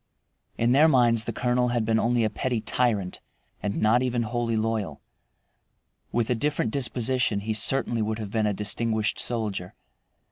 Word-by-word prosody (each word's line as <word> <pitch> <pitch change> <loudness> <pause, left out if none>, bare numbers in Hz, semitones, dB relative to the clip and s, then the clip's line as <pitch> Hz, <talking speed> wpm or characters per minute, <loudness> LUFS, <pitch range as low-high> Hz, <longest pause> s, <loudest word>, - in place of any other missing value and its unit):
In 115 +1 +2
their 145 +5 +6
minds 120 -6 +3
the - - -2
colonel 125 +2 0
had 120 -2 0
been 110 0 +2
only 120 0 +1
a 110 - +1
petty 120 +2 -2
tyrant, 105 -4 -1 0.4
and 100 -1 -2
not 110 +3 +3
even 125 -2 0
wholly 115 0 -1
loyal. 110 -8 -2 1.1
With 120 0 0
a - - +5
different 130 -2 -1
disposition 125 -4 0
he 110 +2 -2
certainly 120 +1 +2
would 110 0 -2
have 105 -3 -6
been 110 -1 +1
a - - +1
distinguished 110 +2 -1
soldier. 105 -6 -2
115 Hz, 165 wpm, -25 LUFS, 110-120 Hz, 1.1 s, their